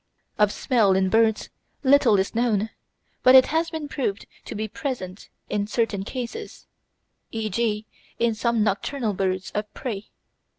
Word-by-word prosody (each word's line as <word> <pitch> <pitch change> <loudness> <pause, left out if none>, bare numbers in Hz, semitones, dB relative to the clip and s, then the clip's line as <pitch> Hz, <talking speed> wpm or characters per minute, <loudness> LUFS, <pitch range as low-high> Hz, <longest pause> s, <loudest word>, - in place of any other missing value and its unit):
Of 210 -1 +4
smell 220 -8 +2
in 190 0 +2
birds 220 +1 +2 0.3
little 265 -6 +5
is 190 +1 0
known, 225 -2 +1 0.5
but 255 +1 +7
it 260 - +9
has 330 +1 +1
been 320 -2 -5
proved 230 -9 -3 0.2
to - - -6
be 215 +1 -2
present 215 - -5 0.2
in 205 0 -1
certain 220 -3 0
cases, 255 - -6 0.6
e.g. 220 0 -1 0.3
in 235 -1 +2
some 230 0 +1
nocturnal 215 +3 -1
birds 190 0 -2
of 210 0 -3
prey. 215 -5 -5
220 Hz, 140 wpm, -24 LUFS, 205-250 Hz, 0.6 s, it